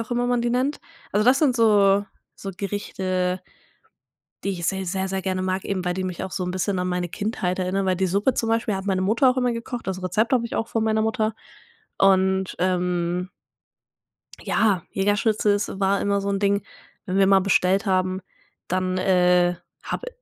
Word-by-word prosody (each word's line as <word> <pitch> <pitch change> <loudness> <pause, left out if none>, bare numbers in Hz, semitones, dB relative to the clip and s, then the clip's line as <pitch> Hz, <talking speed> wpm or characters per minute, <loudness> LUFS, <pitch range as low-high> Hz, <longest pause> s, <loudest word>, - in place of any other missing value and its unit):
auch 230 +1 -6
immer 245 0 0
man 245 -1 +1
die 240 - 0
nennt. 260 +4 0 0.3
Also, 210 +2 +2
das 255 +2 +5
sind 275 -5 +3
so 205 -3 +4 0.3
so 195 - -6
Gerichte 185 -2 -2 1.0
die 200 - 0
ich 175 -3 -3
sehr, 190 0 -1
sehr, 190 +1 -2
sehr 190 0 -3
gerne 185 0 -1
mag, 185 0 -2
eben 190 -2 -2
weil 180 0 -1
die 185 0 -3
mich 180 -1 -4
so 185 0 -3
'n 180 - -3
bisschen 185 +1 -1
an 180 0 -1
meine 180 -1 -2
Kindheit 190 -1 -2
erinnern, 190 +1 -1
weil 185 -1 +1
die 190 0 +1
Suppe 205 +8 +1
zum 225 - -1
Beispiel 225 -2 +1
hat 190 - -5
meine 190 -2 +1
Mutter 235 +7 +4
auch 255 - -2
immer 250 -1 +1
gekocht. 230 0 -6
Das 190 -1 -3
Rezept 210 +7 0
habe 240 -2 +3
ich - - -7
auch 225 - -2
von 225 -1 -1
meiner 220 0 +1
Mutter. 220 0 0 0.6
Und, 190 -1 +3
ähm 180 0 0 1.1
ja, 200 -6 +1
Jägerschnitzel, 205 +1 +1
ist 200 -1 -3
war 195 +1 +2
immer 200 0 +1
so 200 - -3
'n 200 0 0
Ding, 200 0 +1 0.4
wenn 185 - -2
wir 195 - +5
mal 195 0 +5
bestellt 195 +2 +2
haben, 185 0 +1 0.5
dann, 185 0 0
äh, 180 -1 +3 0.3
habe - - -4
195 Hz, 195 wpm, -23 LUFS, 185-215 Hz, 1.1 s, das